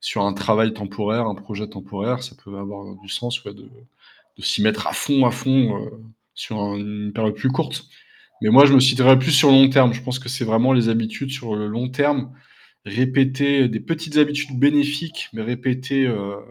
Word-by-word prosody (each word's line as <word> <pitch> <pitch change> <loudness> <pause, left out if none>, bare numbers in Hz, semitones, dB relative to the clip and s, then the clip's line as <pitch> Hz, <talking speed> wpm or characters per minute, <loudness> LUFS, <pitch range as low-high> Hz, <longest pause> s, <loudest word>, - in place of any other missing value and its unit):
sur 100 - -3
un 100 - 0
travail 110 +2 +1
temporaire, 105 +2 -3
un 105 -3 -4
projet 100 +1 -8
temporaire, 100 +6 -5
ça 125 - -11
peut 100 0 -12
avoir, 100 0 -9
heu, - - -13
du 95 - -19
sens, 120 +4 -5
ouais, 100 - -10
de 100 - -17 0.8
de - - -15
s'y - - -1
mettre 110 0 0
à - - -3
fond, 140 -2 +1
à - - +3
fond, 125 -2 +1
heu, - - -10 0.4
sur 110 - -7 0.2
une 105 0 -6
période 110 -2 -1
plus 130 +5 -1
courte. 130 - -4 0.6
Mais - - +1
moi, 135 +5 +9
je 140 - +3
me 130 - +8
situerais 130 0 +6
plus 130 +4 -1
sur 140 0 +6
le 135 - +9
long 135 0 +8
terme. 130 -3 +4
Je 125 +1 -7
pense 125 0 -4
que 130 -1 -11
c'est 130 0 -3
vraiment 115 +4 +2
les 120 -3 +2
habitudes, 115 +4 -2
sur 125 -5 -5
le 105 0 -4
long 120 +4 -4
terme, 135 -1 -1 0.5
répétées, 130 +4 +1
des 110 -1 -4
petites 160 -2 -5
habitudes 145 -2 +1
bénéfiques, 145 +3 0
mais 110 0 -6
répétées, 130 +3 -2
heu, 100 -4 -4
125 Hz, 205 wpm, -20 LUFS, 105-135 Hz, 0.8 s, moi